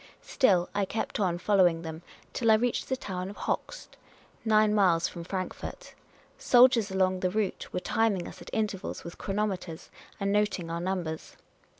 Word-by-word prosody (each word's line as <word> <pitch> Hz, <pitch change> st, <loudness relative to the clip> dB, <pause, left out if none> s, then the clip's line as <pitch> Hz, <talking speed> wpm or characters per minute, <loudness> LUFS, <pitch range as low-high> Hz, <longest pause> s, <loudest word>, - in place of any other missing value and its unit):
Still 185 Hz, -10 st, +3 dB
I 205 Hz, 0 st, +1 dB
kept 215 Hz, +3 st, -3 dB
on 180 Hz, -4 st, +1 dB
following 175 Hz, -4 st, +3 dB
them, 160 Hz, 0 st, -6 dB, 0.3 s
till 230 Hz, -3 st, +1 dB
I 220 Hz, -, +8 dB
reached 240 Hz, +2 st, -1 dB
the 260 Hz, -, 0 dB
town 185 Hz, -4 st, -5 dB
of 205 Hz, -, -10 dB
Hochst -, -, -4 dB, 0.2 s
— -, -, -30 dB
nine 215 Hz, -1 st, +4 dB
miles 180 Hz, -5 st, +3 dB
from 170 Hz, -, -8 dB
Frankfort. 190 Hz, -, -6 dB, 0.5 s
Soldiers 245 Hz, -4 st, +5 dB
along 185 Hz, -1 st, +1 dB
the 185 Hz, -, +1 dB
route 210 Hz, 0 st, -2 dB
were -, -, -2 dB
timing 200 Hz, -1 st, 0 dB
us -, -, -11 dB
at -, -, -10 dB
intervals 210 Hz, -4 st, -3 dB
with 170 Hz, -, -9 dB
chronometers, 195 Hz, -5 st, -3 dB, 0.3 s
and 200 Hz, 0 st, 0 dB
noting 205 Hz, -5 st, 0 dB
our 170 Hz, 0 st, -3 dB
numbers. 175 Hz, -4 st, -4 dB
195 Hz, 170 wpm, -28 LUFS, 180-215 Hz, 0.5 s, I